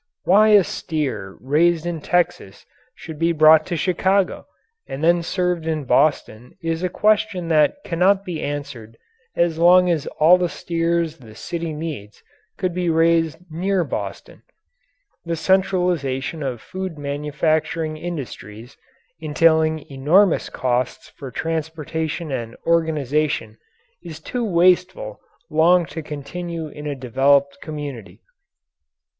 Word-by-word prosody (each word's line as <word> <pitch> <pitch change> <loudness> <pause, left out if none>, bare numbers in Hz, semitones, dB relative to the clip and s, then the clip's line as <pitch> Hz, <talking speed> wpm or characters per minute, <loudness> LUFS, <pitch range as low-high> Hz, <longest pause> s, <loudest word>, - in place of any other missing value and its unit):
Why 210 +4 +5
a 210 -2 +6
steer 130 - -4
raised 160 +5 +2
in 170 -3 -3
Texas 175 - -1 0.3
should 160 -2 -10
be 165 +1 +2
brought 155 0 +6
to 175 - -2
Chicago 190 +3 0 0.4
and 140 - -6
then 170 +1 +4
served 180 -1 -2
in 155 -2 -1
Boston 125 -3 0
is 165 -1 -3
a 180 - -1
question 210 -3 +1
that 155 - +3
cannot 190 +3 +2
be 175 -4 -4
answered 140 -6 -6 0.4
as 170 -2 +1
long 180 +1 +6
as 160 -4 -1
all 170 +4 +6
the 175 -1 0
steers 165 -1 -1
the 110 -4 -14
city 170 +5 -5
needs 150 -10 -7 0.3
could 185 -2 -2
be 180 -1 -1
raised 165 -1 +2
near 185 +3 0
Boston. 105 -9 -6 0.8
The 170 0 -2
centralization 170 -5 0
of 130 -5 -4
food 185 -3 -6
manufacturing 155 +2 -1
industries, 125 - -8 0.4
entailing 160 0 +2
enormous 160 +8 +3
costs 125 -1 -2
for 135 - -10
transportation 160 +2 -4
and 115 -3 -4
organization, 150 -7 0 0.4
is 160 -2 -9
too 245 +9 -4
wasteful 185 - +1 0.3
long 170 +3 +4
to 160 - -4
continue 155 +2 -6
in 150 0 -8
a 145 - -3
developed 135 +2 +1
community. 145 -8 -7
160 Hz, 125 wpm, -21 LUFS, 145-175 Hz, 0.8 s, a